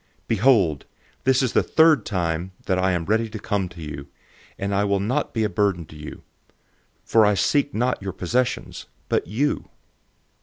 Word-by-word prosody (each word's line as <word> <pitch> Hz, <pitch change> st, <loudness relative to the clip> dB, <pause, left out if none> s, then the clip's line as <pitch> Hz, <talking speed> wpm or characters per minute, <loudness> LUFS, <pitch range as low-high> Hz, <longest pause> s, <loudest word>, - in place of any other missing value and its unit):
012:014 -, -, -43 dB
Behold, 105 Hz, -, +3 dB, 0.4 s
this 130 Hz, 0 st, +3 dB
is 125 Hz, -, 0 dB
the -, -, +4 dB
third 160 Hz, -7 st, +4 dB
time 90 Hz, -2 st, -2 dB
I 95 Hz, 0 st, +2 dB
am 85 Hz, -2 st, -1 dB
ready 110 Hz, +3 st, +1 dB
to 110 Hz, -, -6 dB
come 100 Hz, -3 st, -2 dB
to 85 Hz, -2 st, -10 dB
you, 70 Hz, -2 st, -7 dB, 0.5 s
and 100 Hz, +1 st, -2 dB
I 100 Hz, +1 st, +2 dB
will 100 Hz, -1 st, +1 dB
not 125 Hz, +9 st, -1 dB
be 110 Hz, -, -1 dB
a -, -, +2 dB
burden 100 Hz, -5 st, 0 dB
to 75 Hz, -, -15 dB
you; 75 Hz, 0 st, -9 dB, 0.8 s
for 115 Hz, -, +4 dB
I 105 Hz, -1 st, +4 dB
seek 145 Hz, -, +1 dB
not 125 Hz, +1 st, 0 dB
your 95 Hz, 0 st, -4 dB
possessions, 125 Hz, +9 st, -2 dB, 0.2 s
but -, -, 0 dB
you. 130 Hz, +10 st, -1 dB
100 Hz, 180 wpm, -23 LUFS, 90-120 Hz, 0.8 s, the